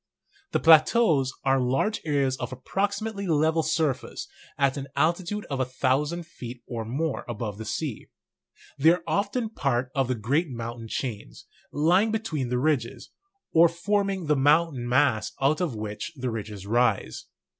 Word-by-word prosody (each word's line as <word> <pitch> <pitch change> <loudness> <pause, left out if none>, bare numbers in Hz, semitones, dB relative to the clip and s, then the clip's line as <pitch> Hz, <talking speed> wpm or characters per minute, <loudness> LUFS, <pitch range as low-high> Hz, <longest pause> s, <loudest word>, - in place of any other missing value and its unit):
The - - +1
plateaus 160 - +5
are 135 0 +3
large 135 - 0
areas 140 -4 +1
of - - -5
approximately 200 - -2
level 160 0 +2
surface 155 -6 -1 0.3
at 140 -1 +2
an 140 -1 -5
altitude 175 +5 0
of 135 -2 -4
a 130 - +2
thousand 140 +6 0
feet 125 -7 -9
or 115 -2 -4
more 140 +7 -2
above 105 -3 -4
the 110 - -6
sea. 135 +1 -4 0.7
They 155 +4 +6
are 180 - -4
often 215 +3 -1
parts 130 - -1
of 135 -2 +1
the 130 - 0
great 140 +10 0
moun 120 -1 -6
tain 115 - -8
chains, 105 - -5 0.3
lying 175 +9 +3
between 190 - -2
the 125 - 0
ridges, 130 -4 -1 0.4
or 170 +1 +7
forming 195 +2 -1
the 150 0 +2
mountain 145 -3 +2
mass 125 -4 +2
out 145 +6 +2
of 160 -10 -1
which 105 +8 -5
the 130 -3 -3
ridges 105 -3 -6
rise. 115 - 0
140 Hz, 155 wpm, -26 LUFS, 125-170 Hz, 0.7 s, or